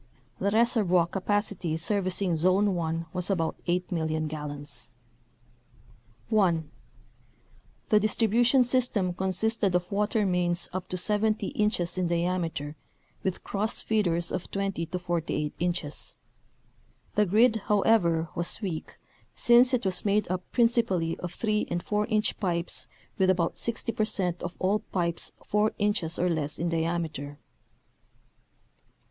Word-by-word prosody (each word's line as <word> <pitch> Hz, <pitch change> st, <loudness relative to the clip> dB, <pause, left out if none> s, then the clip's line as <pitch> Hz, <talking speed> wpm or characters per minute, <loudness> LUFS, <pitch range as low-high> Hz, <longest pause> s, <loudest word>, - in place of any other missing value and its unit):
The 200 Hz, -, +1 dB
reservoir 210 Hz, -6 st, +3 dB
capacity 195 Hz, -3 st, -1 dB
servicing 185 Hz, 0 st, 0 dB
Zone 185 Hz, +5 st, +3 dB
1 165 Hz, -1 st, -2 dB
was 180 Hz, 0 st, -2 dB
about 165 Hz, -5 st, 0 dB
8,000,000 160 Hz, -3 st, -1 dB
gallons. 145 Hz, -5 st, -6 dB, 1.3 s
(1) 170 Hz, -7 st, +2 dB, 1.2 s
The 210 Hz, -, +5 dB
distribution 230 Hz, +4 st, +3 dB
system 240 Hz, -7 st, +1 dB
consisted 190 Hz, +2 st, +1 dB
of 180 Hz, +2 st, -1 dB
water 210 Hz, +1 st, +1 dB
mains 175 Hz, -2 st, +1 dB
up 185 Hz, -1 st, -4 dB
to 185 Hz, -, -3 dB
70 210 Hz, +2 st, 0 dB
inches 185 Hz, -4 st, 0 dB
in 180 Hz, -, +1 dB
diameter 170 Hz, -4 st, -1 dB, 0.5 s
with 190 Hz, -1 st, -3 dB
cross 215 Hz, +3 st, -1 dB
feeders 175 Hz, -6 st, +1 dB
of 180 Hz, -, -4 dB
20 195 Hz, -4 st, -2 dB
to 180 Hz, -, -3 dB
48 165 Hz, -4 st, -2 dB
inches. 170 Hz, -3 st, -2 dB, 1.0 s
The 210 Hz, -1 st, +2 dB
grid, 225 Hz, +4 st, +4 dB
however, 190 Hz, -6 st, +3 dB
was 175 Hz, -, 0 dB
weak 180 Hz, -7 st, -5 dB, 0.4 s
since 240 Hz, +2 st, +5 dB
it 250 Hz, -5 st, 0 dB
was 185 Hz, -2 st, 0 dB
made 205 Hz, 0 st, +2 dB
up 185 Hz, 0 st, -1 dB
prin 240 Hz, -, +4 dB
cipally 190 Hz, -9 st, +1 dB
of 180 Hz, -1 st, -6 dB
3 215 Hz, -1 st, 0 dB
and 175 Hz, 0 st, -2 dB
4 210 Hz, 0 st, 0 dB
inch 215 Hz, -2 st, 0 dB
pipes 175 Hz, -4 st, -1 dB, 0.3 s
with 190 Hz, -1 st, +4 dB
about 175 Hz, -3 st, +1 dB
60 230 Hz, 0 st, -1 dB
per 215 Hz, -, 0 dB
cent 180 Hz, -5 st, -1 dB
of 175 Hz, 0 st, -5 dB
all 195 Hz, +3 st, +1 dB
pipes 170 Hz, -4 st, -2 dB
4 210 Hz, +1 st, +1 dB
inches 205 Hz, -6 st, +1 dB
or 180 Hz, -, +1 dB
less 155 Hz, -4 st, -1 dB
in 170 Hz, +1 st, -1 dB
diameter. 160 Hz, -4 st, -2 dB
185 Hz, 130 wpm, -28 LUFS, 170-210 Hz, 1.3 s, The